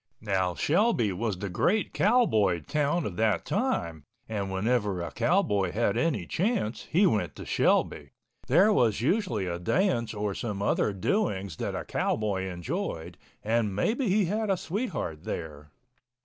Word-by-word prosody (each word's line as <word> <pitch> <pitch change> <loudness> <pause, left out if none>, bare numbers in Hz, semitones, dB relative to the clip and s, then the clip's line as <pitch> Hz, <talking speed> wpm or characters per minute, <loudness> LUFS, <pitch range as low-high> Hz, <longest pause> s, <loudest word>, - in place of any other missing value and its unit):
Now 95 -4 0
Shelby 160 - +2
was 100 +1 -2
the 100 - -4
great 195 - +1
cowboy 145 - +3
town 150 - 0
of 90 - -5
that 110 -5 +1
time, 80 -3 -1 0.2
and 100 -3 -3
whenever 105 -1 0
a 85 - -4
cowboy 115 - +1
had 115 +2 +1
any 135 - 0
chance 185 - -1
he 185 +6 +4
went 110 - +1
to - - -8
Shelby. 70 -2 +1 0.4
There 210 +4 +5
was 115 - +2
usually 130 - 0
a 85 -1 -3
dance 120 - 0
or 105 -1 -2
some 105 -1 -4
other 100 +1 +1
doings 100 - -1
that - - -3
a - - -4
cowboy 100 -3 -1
enjoyed—and 105 +4 -3
maybe 225 - 0
he 200 +1 +3
had 215 +4 -1
a 190 - +2
sweetheart 160 - -4
there. 75 -4 -6
110 Hz, 150 wpm, -28 LUFS, -, 0.4 s, There